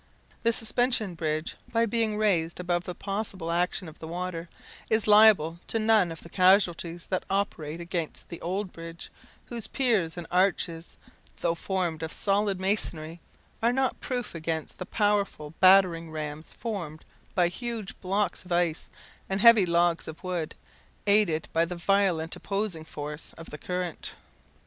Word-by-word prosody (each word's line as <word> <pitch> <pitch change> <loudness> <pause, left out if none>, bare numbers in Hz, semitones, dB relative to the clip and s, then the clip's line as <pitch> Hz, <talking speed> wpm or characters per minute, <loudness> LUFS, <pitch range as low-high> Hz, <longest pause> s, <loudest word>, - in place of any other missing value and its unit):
The 230 - +3
Suspension 225 -3 +2
Bridge, 155 -1 -2 0.2
by 230 0 +3
being 225 -1 0
raised 175 -6 +1
above 175 -1 -1
the 180 - -5
possible 195 -4 -3
action 180 +1 0
of 155 - -12
the 160 - -7
water, 175 0 -4 0.4
is 220 -1 +2
liable 210 -6 +6
to - - +1
none 215 -5 +4
of 165 - -8
the - - -9
casualties 175 -2 +3
that 185 - 0
operate 170 -5 -2
against 170 -2 -3
the 170 - -8
old 185 +2 -3
bridge, 165 0 -8 0.3
whose 230 -3 -4
piers 215 - +1
and 175 - -5
arches, 175 -2 0 0.4
though 170 - +2
formed 175 -2 -2
of 160 0 -4
solid 200 -1 +1
masonry, 175 -4 -2 0.4
are 230 +1 +4
not 265 +1 0
proof 245 -4 -3
against 160 -1 -4
the 180 - -5
powerful 200 -8 0
battering 185 -3 +6
rams 155 0 -6
formed 175 -10 -5 0.3
by 180 -2 +4
huge 225 +2 -4
blocks 200 +2 -1
of 180 - -14
ice 175 -2 +1 0.4
and 195 0 0
heavy 230 -5 +8
logs 170 0 +2
of 160 +3 -9
wood, 175 -4 -3 0.5
aided 200 -6 +3
by 165 - +4
the 175 +1 -3
violent 175 -3 +1
opposing 195 -5 -3
force 150 0 -7
of 165 - -11
the 150 - -6
current. 180 -1 -3
180 Hz, 155 wpm, -28 LUFS, 165-205 Hz, 0.5 s, heavy